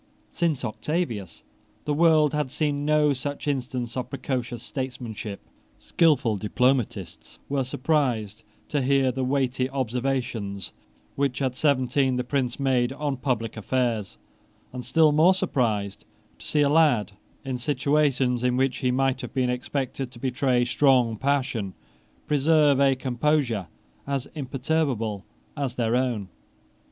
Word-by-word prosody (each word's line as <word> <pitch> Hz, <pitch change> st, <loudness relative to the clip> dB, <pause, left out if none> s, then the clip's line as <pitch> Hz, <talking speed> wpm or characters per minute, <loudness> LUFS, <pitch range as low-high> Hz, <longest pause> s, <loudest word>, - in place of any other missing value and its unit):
Since 160 Hz, -7 st, 0 dB
Octavius 115 Hz, -, -3 dB, 0.4 s
the 150 Hz, -, 0 dB
world 155 Hz, -1 st, +4 dB
had 150 Hz, -3 st, -1 dB
seen 145 Hz, 0 st, -1 dB
no 150 Hz, -1 st, +3 dB
such 145 Hz, +3 st, -5 dB
instance 125 Hz, -4 st, -2 dB
of 125 Hz, -1 st, -3 dB
precocious 125 Hz, -3 st, -3 dB
statesmanship. 120 Hz, -6 st, -5 dB, 0.4 s
Skilful 135 Hz, -10 st, +2 dB
diplomatists 125 Hz, +4 st, -1 dB
were 140 Hz, -1 st, 0 dB
surprised 125 Hz, -6 st, -1 dB, 0.3 s
to 145 Hz, -, 0 dB
hear 135 Hz, 0 st, +3 dB
the 130 Hz, +1 st, -3 dB
weighty 130 Hz, -1 st, 0 dB
observations 120 Hz, -7 st, -2 dB, 0.4 s
which 140 Hz, -2 st, 0 dB
at 130 Hz, -3 st, 0 dB
seventeen 130 Hz, -1 st, +2 dB
the 125 Hz, -, -1 dB
Prince 125 Hz, -1 st, -1 dB
made 130 Hz, -2 st, +2 dB
on 145 Hz, -1 st, -2 dB
public 125 Hz, -4 st, -2 dB
affairs, 115 Hz, -2 st, -1 dB, 0.6 s
and 125 Hz, -1 st, -5 dB
still 160 Hz, +1 st, +4 dB
more 165 Hz, +5 st, +5 dB
surprised 110 Hz, -, -1 dB, 0.4 s
to -, -, -10 dB
see 150 Hz, -, +2 dB
a 145 Hz, -, +4 dB
lad, 145 Hz, -9 st, +3 dB, 0.3 s
in 130 Hz, -2 st, -3 dB
situations 135 Hz, -2 st, +1 dB
in 125 Hz, 0 st, +2 dB
which 130 Hz, -1 st, +1 dB
he 125 Hz, -, +1 dB
might 135 Hz, +1 st, +1 dB
have -, -, -8 dB
been 125 Hz, -2 st, +1 dB
expected 130 Hz, +1 st, -3 dB
to 125 Hz, -, -15 dB
betray 125 Hz, -1 st, +1 dB
strong 125 Hz, -3 st, +3 dB
passion, 130 Hz, -6 st, -1 dB, 0.5 s
preserve 150 Hz, -1 st, +3 dB
a 135 Hz, -1 st, +4 dB
composure 130 Hz, -, 0 dB, 0.4 s
as 140 Hz, -2 st, -2 dB
imperturbable 130 Hz, -, -1 dB, 0.3 s
as 140 Hz, -4 st, -3 dB
their 115 Hz, -1 st, +1 dB
own. 120 Hz, -6 st, 0 dB
130 Hz, 130 wpm, -25 LUFS, 120-145 Hz, 0.6 s, more